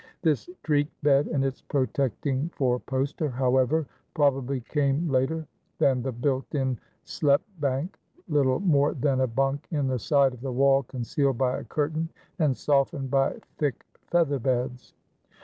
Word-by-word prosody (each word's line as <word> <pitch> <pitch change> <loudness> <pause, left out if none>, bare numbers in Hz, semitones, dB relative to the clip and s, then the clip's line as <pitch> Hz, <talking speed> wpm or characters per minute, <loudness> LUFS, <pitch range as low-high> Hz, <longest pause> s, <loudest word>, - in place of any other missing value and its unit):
This 155 -4 +1
treke 145 -2 +2 0.2
bed 140 0 +4
and 135 -3 0
its 135 -1 -3
protecting 135 +2 -1
four 125 -3 +1
poster, 135 +4 -2
however, 130 +4 +2 0.3
probably 135 -3 +1
came 145 +5 0
later 150 +4 0 0.3
than 130 -2 +3
the 130 +2 -2
built 130 +4 -2
in 130 -4 0 0.2
sloep 140 -2 +2 0.2
bank, 140 +5 -2 0.3
little 140 -5 +2
more 145 -6 +3
than 135 -1 +1
a 130 - +3
bunk 135 +4 -1
in 145 -4 0
the 130 -1 0
side 140 +2 +3
of 125 - -12
the 135 0 -3
wall 135 +2 +4
concealed 135 +1 -1
by 130 0 +1
a - - -8
curtain 155 +2 -1 0.3
and 145 -5 +2
softened 140 -1 +1
by 135 0 +2 0.2
thick 145 -6 -1 0.2
feather 160 -5 +2
beds. 125 0 -2
135 Hz, 150 wpm, -26 LUFS, 130-145 Hz, 0.3 s, bed